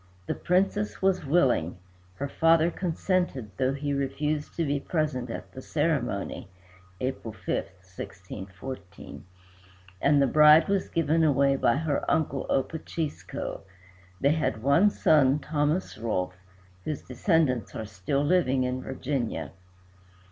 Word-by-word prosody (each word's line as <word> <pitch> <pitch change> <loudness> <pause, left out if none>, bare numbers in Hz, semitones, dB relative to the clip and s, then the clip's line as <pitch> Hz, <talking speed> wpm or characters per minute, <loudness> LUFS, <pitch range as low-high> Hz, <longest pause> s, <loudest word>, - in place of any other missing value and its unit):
The - - -1
Princess 195 +3 0
was 185 -5 +1
willing, 130 - +2 0.4
her 140 - -3
father 165 +3 +3
consented, 175 - -1
though 130 +1 +1
he 145 0 -2
refused 145 +2 -2
to 165 - 0
be 145 0 0
present 140 -6 -2
at - - -7
the 130 - -9
ceremony 130 - -1 0.5
(April 130 -3 -3
5, - - -18
1614), 95 +3 -8 0.8
and 145 0 +4
the 140 - +5
bride 150 +3 +7
was 195 -1 0
given 165 0 +2
away 140 -2 +3
by 120 -3 +2
her 150 -1 -1
uncle 140 -4 0
Opachisco. 155 +2 -3 0.6
They 140 - +3
had 115 -9 -1
one 140 +10 +5
son, 145 -7 +4
Thomas 150 +3 -1
Rolfe, 90 -5 -1 0.5
whose 155 - -4
descendants 130 - 0
are 110 - -4
still 105 +8 -2
living 145 -6 +2
in 125 0 -2
Virginia. 130 -3 -3
140 Hz, 125 wpm, -27 LUFS, 125-160 Hz, 0.8 s, bride